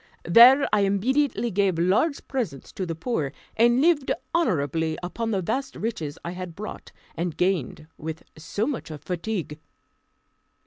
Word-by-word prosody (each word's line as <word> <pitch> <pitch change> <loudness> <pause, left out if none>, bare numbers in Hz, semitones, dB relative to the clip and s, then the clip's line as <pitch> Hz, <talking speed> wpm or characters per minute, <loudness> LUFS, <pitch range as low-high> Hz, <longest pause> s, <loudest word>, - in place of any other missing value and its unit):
There 245 - +8
I 210 - +5
immediately 230 +4 +1
gave 195 -2 +1
large 195 - +1
presents 230 - -4
to 185 - -4
the 165 - -3
poor, 160 - -2 0.2
and 240 +3 +4
lived 310 -4 +3 0.2
honourably 160 - 0
upon 225 +6 -3
the 195 -4 0
vast 265 +8 -2
riches 160 -10 -4
I 170 - -3
had 180 -2 -7
brought, 210 +3 -8 0.2
and 165 -1 -3
gained 180 -5 0
with 160 +1 -6
so 180 +7 -3
much 275 -3 -3
fatigue. 160 +2 -4
195 Hz, 140 wpm, -25 LUFS, 165-240 Hz, 0.2 s, There